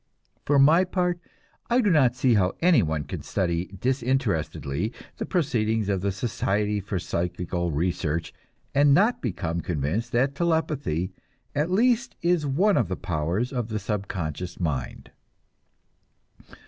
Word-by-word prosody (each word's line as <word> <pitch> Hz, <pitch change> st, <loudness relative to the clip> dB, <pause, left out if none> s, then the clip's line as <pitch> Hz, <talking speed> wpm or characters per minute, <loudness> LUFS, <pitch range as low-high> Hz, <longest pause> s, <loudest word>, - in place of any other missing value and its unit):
For 145 Hz, -, +3 dB
my 155 Hz, +6 st, +6 dB
part, 180 Hz, -1 st, -1 dB, 0.5 s
I 240 Hz, +1 st, +4 dB
do 210 Hz, -6 st, +3 dB
not 130 Hz, -7 st, +4 dB
see 125 Hz, -1 st, +3 dB
how 95 Hz, -4 st, +2 dB
any 170 Hz, -7 st, +5 dB
one 80 Hz, -4 st, -1 dB
can -, -, -6 dB
study 85 Hz, -2 st, -1 dB
disinterestedly 115 Hz, -, -1 dB, 0.2 s
the -, -, -4 dB
proceedings 110 Hz, -, 0 dB
of 95 Hz, -2 st, 0 dB
the 100 Hz, +1 st, 0 dB
Society 105 Hz, 0 st, -1 dB
for 100 Hz, 0 st, -3 dB
Psychical 90 Hz, 0 st, -2 dB
Research 85 Hz, 0 st, -1 dB, 0.4 s
and 140 Hz, 0 st, +5 dB
not 210 Hz, +8 st, +3 dB
become 85 Hz, -7 st, -2 dB
convinced 85 Hz, -, -2 dB
that 130 Hz, +3 st, +2 dB
telepathy 145 Hz, -, 0 dB, 0.4 s
at 150 Hz, +4 st, 0 dB
least 235 Hz, +5 st, +2 dB
is 170 Hz, -4 st, +2 dB
one 190 Hz, +9 st, +3 dB
of 115 Hz, -, +2 dB
the 95 Hz, -, -2 dB
powers 90 Hz, -, -2 dB
of 120 Hz, -3 st, -2 dB
the 110 Hz, -, -2 dB
subconscious 95 Hz, -5 st, -4 dB
mind. 75 Hz, -8 st, -3 dB
110 Hz, 135 wpm, -25 LUFS, 90-145 Hz, 0.5 s, my